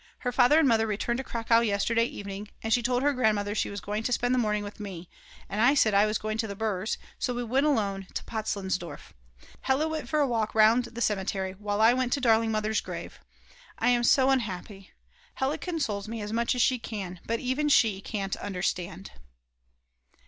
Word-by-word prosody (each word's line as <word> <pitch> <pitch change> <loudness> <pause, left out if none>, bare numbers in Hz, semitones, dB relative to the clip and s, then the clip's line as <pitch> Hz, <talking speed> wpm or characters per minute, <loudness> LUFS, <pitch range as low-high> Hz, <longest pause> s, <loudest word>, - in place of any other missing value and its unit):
Her 250 - -1
father 250 +4 +5
and 320 -3 +5
mother 225 -2 +3
returned 220 +3 -1
to - - -3
Cracow 230 -2 +2
yesterday 230 +1 +1
evening, 200 -2 -7 0.2
and 225 0 +1
she 245 - +3
told 245 +2 0
her 290 0 +3
grandmother 210 -5 +1
she 215 - -1
was 200 - -5
going 210 +2 -3
to 235 - -2
spend 245 +1 +1
the 255 - +2
morning 210 -2 0
with 205 +1 -9
me, 185 -4 -8 0.4
and 210 - -2
I 255 +5 +5
said 220 -6 +3
I 200 +2 +5
was 215 0 0
going 215 0 -4
to 225 - 0
the 200 - -6
Brs., 215 -1 -2 0.2
so 250 - -1
we 245 - -2
went 265 +5 +1
alone 200 -8 0
to - - -3
Potzleinsdorf. 190 -5 -4 0.5
Hella 270 +4 +1
went 310 -6 -4
for 305 - +1
a 290 - +4
walk 225 -4 -1
round 220 +3 +5
the 235 0 -8
cemetery 190 -3 -1
while 205 +2 -3
I 225 +2 +6
went 255 -1 0
to 285 - +1
darling 225 -3 +3
Mother's 215 0 0
grave. - - -8 0.6
I 235 - +2
am 240 -1 +3
so 265 +2 +4
unhappy; 195 -5 -3 0.5
Hella 275 +4 -1
consoles 230 - -3
me 225 +1 -5
as 210 0 -5
much 235 +2 +1
as 245 - +3
she 255 -2 +2
can, 190 -6 -6
but 230 0 0
even 275 +4 0
she 215 -8 +3
can't 195 -2 -3
understand. 180 - -4
220 Hz, 205 wpm, -27 LUFS, 205-245 Hz, 0.6 s, I